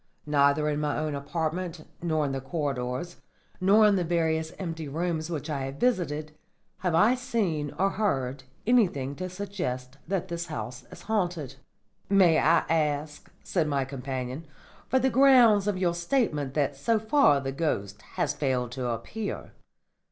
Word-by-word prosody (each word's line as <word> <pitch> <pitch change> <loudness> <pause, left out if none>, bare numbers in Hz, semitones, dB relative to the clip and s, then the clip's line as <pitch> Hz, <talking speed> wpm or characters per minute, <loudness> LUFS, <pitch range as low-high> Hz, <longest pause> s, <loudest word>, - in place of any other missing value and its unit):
Neither 145 0 +3
in 150 -1 0
my 150 -1 -1
own 155 -1 -2
apartment, 160 +3 -3 0.2
nor 155 -3 0
in 140 - -2
the 135 0 -3
corridors, 135 +1 -3 0.4
nor 205 +4 +5
in 205 -2 +4
the 180 - +1
various 160 -1 0
empty 165 -4 -5
rooms 160 +2 -2
which 150 -3 -4
I 140 -4 -2
have 135 +1 -6
visited, 155 - -1 0.4
have 180 -3 0
I 210 +9 +5
seen 210 - -1
or 195 +1 +2
heard 135 -11 -1 0.2
anything 175 - +2
to 185 0 -4
suggest 175 -10 -5
that 190 -1 -1
the 170 -1 -3
house 125 -5 -6
is - - -11
haunted." 175 - -2 0.5
"May 185 -5 +5
I 165 +1 +4
ask," 150 -2 -1
said 165 -5 0
my 140 -2 0
companion, 130 +2 -5 0.4
"for 260 - +2
the 260 +1 +2
grounds 240 -6 +6
of 205 -2 0
your 180 -2 +1
statement 170 - 0
that 145 -2 +1
so 225 +12 +1
far 220 - +4
the 135 -1 -3
ghost 105 -10 -2
has - - 0
failed 125 -4 -1
to 125 0 -3
appear?" 120 - -4
160 Hz, 160 wpm, -27 LUFS, 140-185 Hz, 0.5 s, grounds